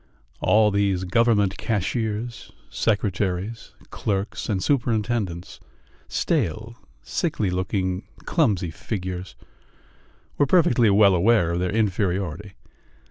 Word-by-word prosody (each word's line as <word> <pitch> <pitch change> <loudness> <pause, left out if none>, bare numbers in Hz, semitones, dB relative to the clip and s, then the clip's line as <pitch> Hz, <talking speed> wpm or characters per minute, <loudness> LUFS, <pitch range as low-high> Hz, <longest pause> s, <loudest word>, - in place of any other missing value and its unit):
All 105 0 +4
these 100 -2 +1
government 105 0 +2
cashiers, 110 +2 -2 0.2
secretaries, 105 0 -1 0.2
clerks, 100 0 -3
and 100 -3 0
superintendents 115 -8 -1 0.5
stale, - - -1 0.3
sickly 95 +8 -1
looking, 95 0 -2 0.2
clumsy 90 -5 +1
figures 95 0 -5 1.0
were 145 - +4
perfectly 130 - +4
well 100 -1 +5
aware 90 -1 +3
of 85 - -1
their 90 0 0
inferiority. 100 -3 -1
100 Hz, 90 wpm, -24 LUFS, 95-110 Hz, 1.0 s, well